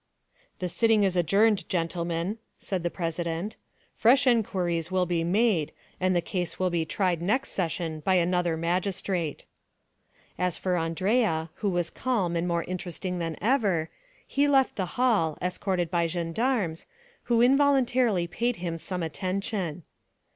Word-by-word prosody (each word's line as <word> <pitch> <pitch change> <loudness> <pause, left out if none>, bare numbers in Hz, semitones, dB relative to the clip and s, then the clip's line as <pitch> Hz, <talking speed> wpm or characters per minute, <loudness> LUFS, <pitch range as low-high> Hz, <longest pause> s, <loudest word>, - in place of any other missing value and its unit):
"The 180 - -2
sitting 220 +3 +3
is 190 -2 +1
adjourned, 195 +2 +3
gentlemen," 170 +3 -2 0.2
said 190 -3 -3
the 175 - -1
president; 170 +3 -3 0.4
"fresh 255 +5 +4
inquiries 180 -9 +1
will 185 -1 +1
be 170 -1 0
made, 185 -3 +2 0.3
and 185 0 +2
the 175 - +1
case 175 -3 -3
will 185 -1 0
be 170 -2 0
tried 175 0 0
next 220 +10 0
session 165 -3 -2
by 185 +5 +1
another 175 -1 +1
magistrate." 175 -1 -2 0.9
As 180 -2 0
for 185 -1 -1
Andrea, 165 0 0
who 205 - 0
was 175 -2 -1
calm 205 -10 -1
and 170 +1 0
more 170 -1 0
interesting 180 0 -4
than 165 -2 -3
ever, 200 - +1 0.3
he 285 +1 +1
left 270 -2 +3
the 185 -2 -2
hall, 215 -12 +2
escorted 180 -1 -1
by 170 -2 +2
gendarmes, 175 +2 -1 0.4
who 235 -1 +3
involuntarily 255 -7 +3
paid 235 +8 -1
him 170 -3 -4
some 180 +1 -4
attention. 185 0 -3
180 Hz, 140 wpm, -27 LUFS, 170-210 Hz, 0.9 s, fresh